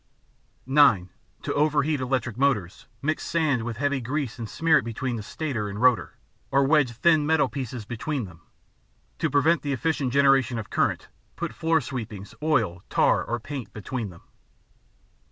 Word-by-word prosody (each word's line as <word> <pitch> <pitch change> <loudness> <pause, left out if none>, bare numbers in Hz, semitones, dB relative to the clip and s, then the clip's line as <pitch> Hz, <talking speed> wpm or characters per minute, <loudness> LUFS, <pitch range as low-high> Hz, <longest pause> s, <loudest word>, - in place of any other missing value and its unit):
(9) 125 -10 +4 0.3
To - - -2
overheat 150 0 +2
electric 125 -3 -1
motors, 120 -10 0 0.2
mix 155 +2 -1
sand 155 -7 +1
with 115 -1 -4
heavy 140 0 0
grease 130 0 -3
and 115 -2 -5
smear 160 -1 +3
it - - -5
between 120 +2 -3
the 110 - -4
stator 115 -2 -3
and 100 +1 -6
rotor, 125 -1 +2 0.3
or 140 +1 +3
wedge 135 -3 +3
thin 155 +6 +3
metal 160 -1 +3
pieces 125 -5 -5
between 125 +3 -3
them. 85 -3 -14 0.8
To - - +1
prevent 155 +3 +3
the 145 -1 -2
efficient 145 -2 -1
generation 135 -2 +3
of 110 - -6
current, - - 0 0.3
put - - -4
floor 160 0 +1
sweepings, 110 -8 -6
oil, 130 - +1
tar, - - +3
or 120 +1 -3
paint 120 -4 -7
between 110 +1 -4
them. 85 -2 -15
130 Hz, 160 wpm, -25 LUFS, 115-145 Hz, 0.8 s, 9